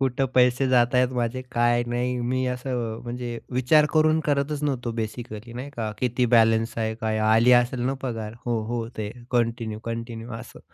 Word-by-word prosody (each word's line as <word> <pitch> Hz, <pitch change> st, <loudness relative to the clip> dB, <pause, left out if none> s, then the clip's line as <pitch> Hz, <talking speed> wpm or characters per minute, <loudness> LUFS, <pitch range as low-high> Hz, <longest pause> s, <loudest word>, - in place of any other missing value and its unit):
कुठे 135 Hz, 0 st, +1 dB
पैसे 125 Hz, +1 st, +4 dB
जातायत 125 Hz, 0 st, +4 dB
माझे 120 Hz, +2 st, -1 dB
काय 120 Hz, 0 st, +3 dB
नाही. 125 Hz, +1 st, -1 dB
मी 130 Hz, +2 st, 0 dB
असं 120 Hz, -3 st, -3 dB
म्हणजे 120 Hz, -1 st, -5 dB, 0.2 s
विचार 150 Hz, +4 st, +5 dB
करून 155 Hz, 0 st, +4 dB
करतच 145 Hz, 0 st, 0 dB
नव्हतो 130 Hz, -5 st, -1 dB
बेसिकली, 110 Hz, 0 st, -7 dB
नाही 130 Hz, +4 st, -6 dB
का? 110 Hz, -2 st, -2 dB
किती 125 Hz, 0 st, +1 dB
बॅलन्स 115 Hz, 0 st, +3 dB
आहे? 110 Hz, 0 st, -1 dB
काय 110 Hz, -1 st, 0 dB
आली 115 Hz, +3 st, +5 dB
असेल 120 Hz, +1 st, -5 dB
ना 135 Hz, -, 0 dB
पगार? 115 Hz, -4 st, -4 dB
हो 115 Hz, -2 st, 0 dB
हो. 115 Hz, 0 st, -2 dB
ते 105 Hz, -1 st, -3 dB, 0.2 s
कंटिन्यू, 115 Hz, -3 st, 0 dB
कंटिन्यू 115 Hz, 0 st, -5 dB
असं. 120 Hz, -, -12 dB
120 Hz, 170 wpm, -25 LUFS, 115-130 Hz, 0.2 s, विचार